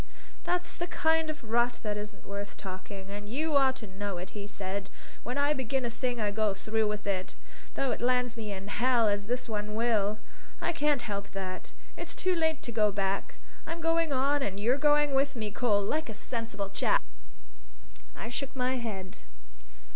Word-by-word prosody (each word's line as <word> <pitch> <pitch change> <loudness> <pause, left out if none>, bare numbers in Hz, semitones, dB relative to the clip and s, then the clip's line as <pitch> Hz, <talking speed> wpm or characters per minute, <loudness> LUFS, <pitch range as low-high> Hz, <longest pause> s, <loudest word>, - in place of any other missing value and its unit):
"That's 355 0 0
the 345 - -2
kind 320 -1 +2
of 310 -4 -5
rot 240 +2 +2
that 210 -2 0
isn't 210 -1 -6
worth 200 +1 -5
talking, 190 +1 -7
and 205 +1 -6
you 300 +5 0
ought 265 -2 +5
to 225 - -8
know 200 -1 -4
it," 180 +1 -5 0.2
said 195 0 -3
he. - - -23 0.3
"When 245 +4 -3
I 285 +1 +4
begin 265 -1 0
a 235 - -1
thing 245 0 -1
I 210 -2 +1
go 210 -1 +2
through 220 +2 +1
with 210 0 -2
it, 190 -2 -1 0.4
though 270 -2 +1
it - - -2
lands 250 0 +2
me 220 -3 -4
in 195 0 -5
hell, 240 0 +4
as 205 0 +1
this 245 +2 -1
one 210 -1 -2
will. 215 -2 +2 0.4
I - - +1
can't 295 -5 +2
help 200 -3 -3
that. 185 -1 -4 0.3
It's - - -5
too 370 0 +2
late 320 -2 +1
to 235 - -4
go 215 -2 +4
back. 195 0 -1 0.3
I'm 330 +1 -3
going 330 -1 +2
on 280 +2 +3
and 200 -5 -1
you're 245 +6 +3
going 295 -1 +5
with 275 +1 +2
me, 215 -3 -2
Cole, 205 -3 +2
like 310 +7 0
a 220 - -5
sensible 220 -3 -3
chap!" 195 - +3 1.1
I 220 - -5
shook 275 +2 -3
my 255 0 +1
head. 195 -6 -4
230 Hz, 190 wpm, -30 LUFS, 205-270 Hz, 1.1 s, ought